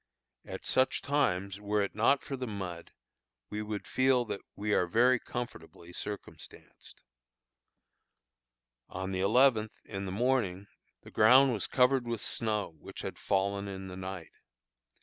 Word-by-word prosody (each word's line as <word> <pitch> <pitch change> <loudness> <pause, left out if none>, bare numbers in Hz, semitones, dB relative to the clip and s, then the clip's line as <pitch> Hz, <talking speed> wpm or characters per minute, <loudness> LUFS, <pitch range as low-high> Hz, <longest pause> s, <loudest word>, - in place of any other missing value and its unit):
At - - -7
such 130 0 +2
times, 100 -9 0
were 105 0 0
it 100 - -3
not 115 +6 +3
for 135 - -4
the 130 -1 -4
mud, 95 -5 -6 0.6
we 105 - -3
would 105 -1 -4
feel 130 -1 +2
that 100 - -5
we 105 +1 -1
are 90 - +3
very 120 +7 +4
comfortably 85 -10 -7
circumstanced. 105 +2 -9 1.9
On 95 +1 -4
the 95 - -2
eleventh, 110 +1 +3
in 100 -2 -5
the - - -4
morning, 105 -4 0 0.4
the - - -13
ground 130 +4 +6
was 105 - -1
covered 125 -1 +3
with 115 -1 -2
snow 110 -2 -2
which - - -9
had - - -6
fallen 100 +1 0
in 95 -1 -6
the 90 - -7
night. 95 -3 -7
105 Hz, 145 wpm, -31 LUFS, 95-125 Hz, 1.9 s, ground